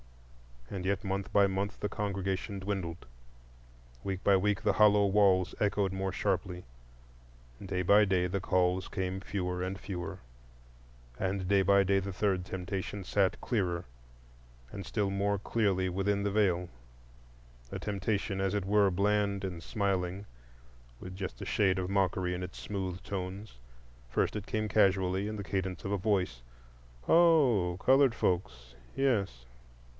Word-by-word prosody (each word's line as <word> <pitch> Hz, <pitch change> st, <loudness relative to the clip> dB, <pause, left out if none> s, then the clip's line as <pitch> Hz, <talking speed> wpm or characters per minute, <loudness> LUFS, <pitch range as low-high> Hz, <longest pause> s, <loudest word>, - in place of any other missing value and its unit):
And 95 Hz, -2 st, -4 dB
yet 100 Hz, +1 st, 0 dB
month 95 Hz, -1 st, -3 dB
by 100 Hz, -1 st, +6 dB
month 100 Hz, +2 st, -3 dB
the 105 Hz, -, -1 dB
congregation 100 Hz, 0 st, -3 dB
dwindled, 95 Hz, -3 st, -4 dB, 1.0 s
week 95 Hz, -1 st, -3 dB
by 100 Hz, -, +5 dB
week 100 Hz, +1 st, 0 dB
the -, -, +3 dB
hollow 105 Hz, -1 st, +5 dB
walls 95 Hz, -2 st, +3 dB
echoed 100 Hz, -2 st, +1 dB
more 95 Hz, 0 st, -2 dB
sharply, 90 Hz, -1 st, -1 dB, 1.0 s
day 90 Hz, -1 st, -2 dB
by 105 Hz, +4 st, +6 dB
day 95 Hz, -2 st, +1 dB
the 95 Hz, +2 st, -1 dB
calls 90 Hz, 0 st, +1 dB
came 95 Hz, 0 st, -3 dB
fewer 90 Hz, -2 st, -3 dB
and 95 Hz, +1 st, -3 dB
fewer, 90 Hz, -3 st, -6 dB, 1.0 s
and 95 Hz, -1 st, -1 dB
day 100 Hz, 0 st, +4 dB
by 100 Hz, +1 st, +4 dB
day 95 Hz, +1 st, +2 dB
the 95 Hz, 0 st, -5 dB
third 95 Hz, -2 st, 0 dB
temptation 95 Hz, +2 st, -4 dB
sat 95 Hz, +1 st, +1 dB
clearer 90 Hz, -7 st, -1 dB, 0.9 s
and 100 Hz, -, -7 dB
still 100 Hz, -3 st, -1 dB
more 100 Hz, +1 st, 0 dB
clearly 100 Hz, -3 st, 0 dB
within 100 Hz, +2 st, 0 dB
the 100 Hz, -, 0 dB
Veil; 90 Hz, -4 st, +1 dB, 1.0 s
a -, -, -5 dB
temptation, 100 Hz, 0 st, -2 dB
as 95 Hz, +1 st, 0 dB
it 100 Hz, -2 st, -1 dB
were, 100 Hz, 0 st, +4 dB
bland 100 Hz, +1 st, +1 dB
and 90 Hz, -3 st, -4 dB
smiling, 95 Hz, -1 st, -2 dB, 0.8 s
with 90 Hz, 0 st, -8 dB
just 95 Hz, -11 st, -6 dB
a -, -, -4 dB
shade 95 Hz, -3 st, +2 dB
of 90 Hz, -1 st, -2 dB
mockery 95 Hz, -2 st, +1 dB
in 90 Hz, -, -4 dB
its 90 Hz, 0 st, -7 dB
smooth 95 Hz, -3 st, -4 dB
tones. 95 Hz, -, -6 dB, 0.5 s
First -, -, 0 dB
it 105 Hz, -, -7 dB
came 110 Hz, 0 st, -1 dB
casually, 95 Hz, -1 st, +2 dB
in 110 Hz, -, -4 dB
the 100 Hz, -, -5 dB
cadence 95 Hz, -2 st, -3 dB
of 95 Hz, -, -3 dB
a 100 Hz, -, +1 dB
voice: 95 Hz, -, 0 dB, 0.7 s
"Oh, 135 Hz, -, +4 dB
colored 135 Hz, -2 st, +5 dB
folks? 65 Hz, -, -2 dB, 0.2 s
Yes." 100 Hz, -, 0 dB
95 Hz, 150 wpm, -31 LUFS, 90-100 Hz, 1.0 s, by